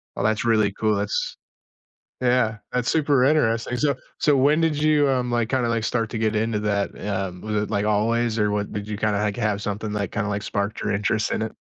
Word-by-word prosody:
Well, - - -2
that's 110 +2 +1
really 110 -3 +3
cool. 110 0 +1
That's 100 0 -2 0.8
yeah, 125 -3 +2 0.2
that's 125 -1 0
super 145 -5 +3
interesting. 120 -5 +2
So 145 +2 +1 0.2
so, 145 -2 +3
when 145 +4 +4
did 160 -2 +1
you, 150 -1 +3
um, 125 -2 0
like, 120 -2 0
kinda, 130 -3 +1
like, 115 -1 0
start 115 0 -1
to 115 - -3
get 110 0 0
into 110 0 0
that? 100 -1 0 0.2
Um, 95 -3 -3
was 105 -1 -1
it 105 - -5
like 100 -2 0
always 115 +2 +1
or 105 0 +2
what? 105 0 -2
Did 105 0 -5
you 105 -1 -4
kind 105 -1 +1
of 100 - 0
hack 105 -1 -1
have 105 -4 -1
something, 105 +1 -3
like, 100 -3 -2
kinda, 105 -1 -1
like, 100 0 -2
sparked 100 0 -2
your - - -1
interest 105 +2 0
in - - -1
it? 110 - -3
110 Hz, 230 wpm, -23 LUFS, 105-125 Hz, 0.8 s, when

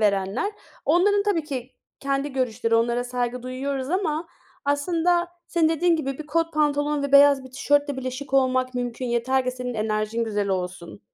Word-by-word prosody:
verenler. 200 - +1 0.3
Onların 405 +4 +3
tabii 400 -6 0
ki 265 -4 -5 0.3
kendi 275 0 -1
görüşleri, 235 -3 0
onlara 235 +2 +2
saygı 245 0 -2
duyuyoruz 265 +2 -3
ama 335 -3 -1 0.4
aslında 340 +4 +1 0.2
senin 330 -2 +3
dediğin 330 +1 +2
gibi 275 -4 -3
bir 310 - -7
kot 330 +2 0
pantolon 295 -1 +1
ve 280 -1 -3
beyaz 280 -1 +7
bir 260 - -11
tişörtle 285 +1 +1
bile 260 -1 -3
şık 270 +2 -6
olmak 255 -1 +2
mümkün, 245 0 -3
yeter 250 +2 +1
ki 255 - 0
senin 250 -1 -5
enerjin 215 +1 -1
güzel 205 -2 -1
olsun. 180 0 -4
265 Hz, 165 wpm, -24 LUFS, 245-300 Hz, 0.4 s, beyaz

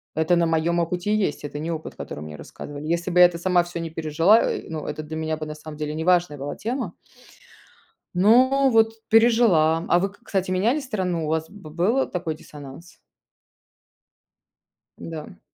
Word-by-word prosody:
Это 160 +3 +2
на 170 -1 +2
моём 165 +1 +1
опыте 175 +4 -1
и - - +3
есть, 190 -9 -1
это 145 0 -6
не 160 +3 -3
опыт, 160 -1 -6
который - - -7
мне 75 0 -8
рассказывали. 145 - -9
Если 170 +2 -1
бы 180 - +2
я 180 - +10
это 175 -1 +1
сама 175 0 +2
всё 175 0 -7
не 165 -1 -4
пережила, 165 +7 +3
э, - - -2
ну, 155 -2 -5
это 150 +1 -5
для 155 +1 -7
меня 160 0 -2
бы, 155 - -5
на 155 - -6
самом 155 0 -10
деле, 150 0 -3
неважная 170 -1 +1
была 140 +1 -5
тема. 230 -4 -4 1.2
Но 255 +8 +4
вот 225 -1 +4 0.2
пережила. 220 -9 +4
А 175 - +4
вы, 195 +2 0
к 200 - -21
кстати, 190 -2 -2
меняли 220 +10 +1
страну, 185 - -2
у - - -4
вас 160 0 -1
б 200 -7 -12
был 190 - +1
такой 170 -3 -3
диссонанс? 150 +2 -12 2.0
Да. 155 - -8
170 Hz, 185 wpm, -23 LUFS, 155-190 Hz, 2.0 s, я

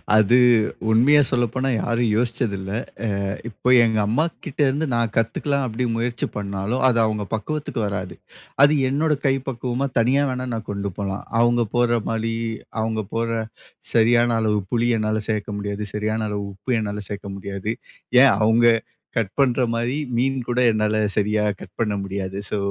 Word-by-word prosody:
அது 110 +3 +5 0.5
உண்மைய 135 +7 +5
சொல்லப்போனா 130 +2 0
யாரும் 115 -1 0
யோசிச்சது 115 -3 -1
இல்ல. 95 +1 -6 0.5
அ - - -1 0.2
இப்ப 125 +4 +1
எங்க 110 -1 +1
அம்மாகிட்டேருந்து 150 - 0
நான் 115 -2 0
கத்துக்கலாம் 135 +4 0
அப்படி 120 +3 -2
முயற்சி 120 +1 -2
பண்ணாலும், 100 +5 -2
அது 115 -2 +3
அவங்க 105 -1 -1
பக்குவத்துக்கு 140 +1 -3
வராது. 90 -3 -4 0.5
அது 145 +1 +6 0.2
என்னோட 150 +2 +1
கை 135 -1 +4
பக்குவமா 125 +2 -2
தனியா 130 +5 +3
வேணா 130 0 -3
நான் 110 -1 -5
கொண்டு 100 -1 -3
போலாம். 100 -1 -3 0.2
அவங்க 120 0 +3
போடுற 120 -1 +3
மாரி, 115 0 -1 0.5
அவங்க 110 0 -1
போடுற 115 0 -1 0.6
சரியான 120 +1 +4
அளவு 105 -1 +1
புளி 120 0 +1
என்னால 110 0 0
சேர்க்க 105 -1 -2
முடியாது. 100 +1 -4
சரியான 110 +1 -1
அளவு 105 -1 -3
உப்பு 120 +5 -2
என்னால 105 -1 -3
சேர்க்க 100 -1 -6
முடியாது. 100 +2 -4 0.5
ஏன் 135 - +6
அவங்க 115 +2 +4 0.5
கட் 100 -4 -1
பண்ணுற 130 -2 +3
மாரி, 120 +3 -1 0.2
மீன் 135 +2 +1
கூட 120 0 0
என்னால 110 0 0 0.2
சரியா 105 +1 +1 0.2
கட் - - -13
பண்ண 105 -3 +1
முடியாது. 95 0 -4
ஸோ 105 - 0
115 Hz, 155 wpm, -22 LUFS, 105-125 Hz, 0.6 s, அது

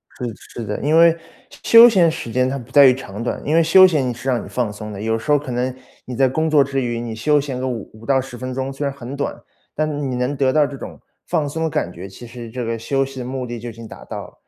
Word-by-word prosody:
是 120 -2 -5 0.3
是 - - -5
的。 105 0 -4
因 150 +4 +2
为 165 0 +6 0.5
休 230 +1 +9
闲 185 -7 +4
时 120 -7 -5
间 130 +2 +1
它 140 - -3
不 125 -1 -11
在 140 0 +7
于 130 - +7
长 115 -4 -7
短， - - -3
因 150 - +1
为 165 - +5
休 185 +4 +7
闲 140 -8 +1
是 130 +3 -5
让 125 -2 0
你 - - -10
放 120 -4 -2
松 105 +1 -8
的。 100 - -7
有 110 +1 0
时 115 +6 -3
候 145 - +6
可 140 -2 -6
能， 125 +1 -2 0.3
你 125 - -6
在 135 +2 +3
工 160 +5 0
作 150 -2 +5
之 135 0 -2
余， 120 -2 -2
你 115 -1 -5
休 150 +6 +2
闲 135 -3 -5
个 130 - -2
5- 115 -6 -5
5 110 +1 -14
到 135 0 +3
10 125 -2 -9
分 130 +1 -5
钟， 130 +1 -3
虽 140 +1 -4
然 140 - -5
很 130 0 -7
短， 140 - -3 0.4
但 155 -1 -1
你 - - -2
能 125 +3 -1
得 135 -1 +1
到 150 -1 +4
这 140 -1 -7
种 - - -9 0.3
放 150 - 0
松 160 +2 -2
感 90 - -2
觉， 90 +2 -9
其 100 +5 -12
实 120 -1 -9
这 125 +2 -5
个 115 0 -2
休 135 +4 0
息 135 -1 -9
的 125 - -5
目 130 0 -4
的 120 -1 -6
就 120 +2 -6
已 115 - -9
经 115 0 -10
达 - - -12
到 - - -7
了。 - - -19
130 Hz, 305 characters per minute, -20 LUFS, 120-145 Hz, 0.5 s, 休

